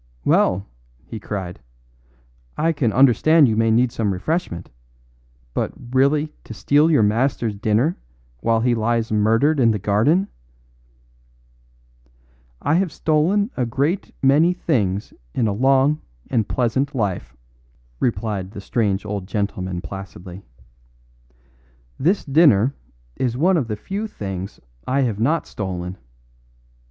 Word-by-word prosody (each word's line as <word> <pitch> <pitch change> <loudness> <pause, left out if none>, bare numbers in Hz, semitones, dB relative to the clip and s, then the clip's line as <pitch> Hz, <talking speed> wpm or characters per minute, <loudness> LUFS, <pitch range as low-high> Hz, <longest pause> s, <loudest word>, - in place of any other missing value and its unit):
"Well," 95 +2 +2 0.4
he 110 - -7
cried. 95 -5 -5 1.0
"I 165 +2 +2
can 135 -8 0
understand 140 +5 +5
you 110 - +1
may 115 +1 +2
need 120 +2 +3
some 110 -4 -1
refreshment, 90 - -3 0.8
but - - -2 0.2
really 145 +4 +2
to 115 - -9
steal 145 +8 +3
your 145 -9 +4
master's 115 +1 +1
dinner 110 - 0 0.4
while 115 - +1
he 120 +1 +2
lies 115 0 0
murdered 115 +8 +2
in 120 -3 +5
the 110 - +1
garden 110 - +2 1.6
" - - -36 0.7
"I 145 - +2
have 185 -4 -2
stolen 180 - +1
a 125 -3 -1
great 145 - -1
many 150 +6 +4
things 105 - -1 0.2
in 120 - +1
a 100 - 0
long 135 +6 +3 0.3
and 110 -4 0
pleasant 130 +3 0
life," 90 - -3 0.6
replied 105 -6 -2
the 100 - -9
strange 100 -1 -1
old 100 -2 -4
gentleman 95 -4 -3
placidly; 95 -1 -9 1.6
"this 180 +8 +1
dinner 140 - +4 0.4
is 125 -2 -1
one 180 +7 +3
of 145 -8 0
the 110 - -3
few 200 - -4
things 95 - -6 0.3
I 135 +2 +1
have 115 -6 -1
not 150 +9 +1
stolen. 90 -2 -5
115 Hz, 125 wpm, -21 LUFS, 100-145 Hz, 1.6 s, understand